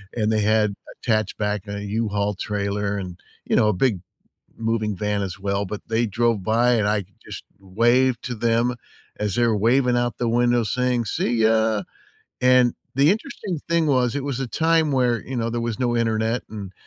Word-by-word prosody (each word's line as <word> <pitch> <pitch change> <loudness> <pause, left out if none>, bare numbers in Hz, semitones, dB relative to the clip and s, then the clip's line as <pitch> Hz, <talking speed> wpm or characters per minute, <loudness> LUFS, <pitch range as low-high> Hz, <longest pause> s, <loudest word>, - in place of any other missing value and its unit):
and 110 -2 +1
they 110 -1 +1
had 105 0 +2 0.3
attached 110 -4 0
back 105 -1 -2
an 100 0 -5
U-Haul 105 -1 -1
trailer 100 +1 -2
and, 90 -3 -6 0.3
you - - 0
know, 105 - +4
a - - +2
big 100 -1 +1 0.6
moving 110 -2 -1
van 105 0 -1
as 95 -1 -5
well, 100 0 -1
but 105 +2 -6
they 115 +1 +1
drove 115 -1 0
by 115 +4 +3
and 110 -3 +1
I 105 -2 0 0.2
just - - -8 0.2
waved 120 +6 +2
to 125 - -3
them 115 +2 +1 0.4
as 105 -2 -1
they 120 -1 +3
were 110 - +2
waving 125 +4 +3
out 120 -2 -1
the 120 - -1
window 120 0 +2
saying, 125 +2 0
"See 115 +3 -1
ya!" 110 -1 +2 0.6
And 125 -1 +4 0.2
the 140 +4 +4
interesting 205 - -3
thing 170 -1 +2
was, 125 -3 +2
it 145 - -2
was 140 -3 -3
a 135 - -2
time 160 +1 +2
where, 125 -3 +2
you 135 - -5
know, 115 -1 -1
there 120 0 -2
was 115 -1 -3
no 120 -1 +1
internet 115 0 0
and 100 -3 -7
115 Hz, 190 wpm, -23 LUFS, 105-125 Hz, 0.6 s, know